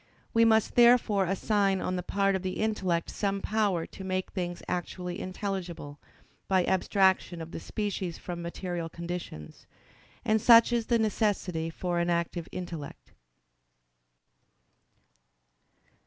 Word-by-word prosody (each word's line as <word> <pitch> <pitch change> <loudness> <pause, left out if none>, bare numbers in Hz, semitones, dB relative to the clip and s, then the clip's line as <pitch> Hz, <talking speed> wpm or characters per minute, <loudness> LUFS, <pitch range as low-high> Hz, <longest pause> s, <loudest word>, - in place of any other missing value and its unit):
We 230 0 +5
must 220 -1 +3
therefore 235 -5 +5
assign 195 +1 +1
on 185 - -2
the 180 - -2
part 195 +2 +1
of 190 - -2
the 185 0 -3
intellect 190 -6 -1
some 200 -1 -1
power 200 -5 0
to 190 - -10
make 185 0 -2
things 175 -1 -4
actually 180 0 -4
intelligible, 185 -6 -5 0.5
by 185 -2 +3
abstraction 190 -2 +2
of 165 0 -7
the - - -5
species 190 -2 -3
from 175 -1 -6
material 170 -1 -4
conditions. 170 - -7 0.6
And 215 0 +2
such 235 +1 +7
is 235 -2 0
the 235 - +3
necessity 200 -6 0
for 175 +1 -2
an 170 0 0
active 170 0 -1
intellect. 170 -5 -7
185 Hz, 125 wpm, -29 LUFS, 175-205 Hz, 0.6 s, such